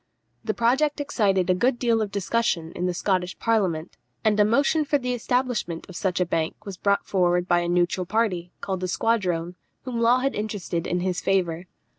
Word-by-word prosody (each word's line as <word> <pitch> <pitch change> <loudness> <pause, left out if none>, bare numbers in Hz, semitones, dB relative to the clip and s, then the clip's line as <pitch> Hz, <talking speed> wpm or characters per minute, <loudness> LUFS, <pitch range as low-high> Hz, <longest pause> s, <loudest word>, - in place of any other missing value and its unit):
The 215 -1 -2
project 270 +6 +2
excited 200 -10 +1
a 185 - +4
good 240 +7 +1
deal 230 -2 +2
of 210 - -1
discussion 195 -4 -1
in 180 +1 -2
the 180 - -1
Scottish 185 -1 -1
Parliament, 185 -8 0 0.3
and 210 -1 +3
a - - +7
motion 280 +8 +2
for 290 0 +1
the 250 -2 -2
establishment 245 -8 -1
of 185 - -11
such 185 -2 -1
a 180 - +2
bank 165 +4 -2
was 200 -2 -6
brought 200 +2 +1
forward 180 -2 +1
by 175 -1 +3
a 175 0 -2
neutral 175 +1 +1
party, 195 -5 0
called 190 -2 -2
the 185 - -2
Squadrone, 180 -5 0 0.3
whom 240 -3 -3
Law 235 +2 +5
had 270 +2 0
interested 205 -5 -3
in 180 0 -1
his 180 -1 -1
favour. 180 -2 0
195 Hz, 195 wpm, -25 LUFS, 180-230 Hz, 0.3 s, a